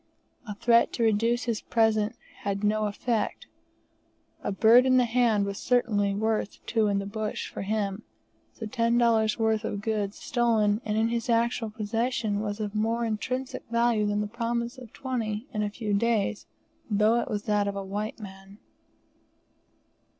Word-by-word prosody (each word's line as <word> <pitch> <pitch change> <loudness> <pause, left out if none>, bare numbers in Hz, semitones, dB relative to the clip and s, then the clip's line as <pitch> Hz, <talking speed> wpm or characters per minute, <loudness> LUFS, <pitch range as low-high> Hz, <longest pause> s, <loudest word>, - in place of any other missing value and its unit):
A 210 - -5
threat 235 +2 +4
to 235 - -1
reduce 230 +2 +2
his 230 -3 -2
present 220 -1 +1 0.2
had 200 0 -3
no 215 +1 +2
effect; 220 +2 -2 1.0
a - - -1
bird 230 +5 +6
in 255 0 +5
the 250 - +4
hand 230 -3 +2
was 200 0 -4
certainly 205 -5 +1
worth 220 0 -1
two 225 -2 +1
in 200 -1 +1
the 200 - -2
bush 210 +1 -4
for - - -6
him, 200 0 -2 0.5
so 225 - -8
ten 230 +1 +1
dollars' 225 -2 +3
worth 220 -1 +1
of 205 -2 -3
goods 210 -2 -2
stolen 220 -3 +1
and 215 0 -1
in 225 +1 +2
his 235 +1 -2
actual 230 -1 +1
possession 220 0 -1
was 205 0 -3
of 210 -2 -3
more 225 +2 0
intrinsic 255 +4 -3
value 235 -2 +2
than 205 0 0
the - - -1
promise 235 +3 -3
of 245 -4 -12
$20 230 -4 -3
in 210 - -1
a 210 - 0
few 210 0 -3
days, 215 -1 0 0.4
though 215 +2 +3
it - - -5
was 205 -1 -2
that 205 -1 +1
of 200 - -2
a 195 -1 -4
white 205 +4 -4
man. 195 -1 -11
220 Hz, 170 wpm, -27 LUFS, 205-235 Hz, 1.0 s, bird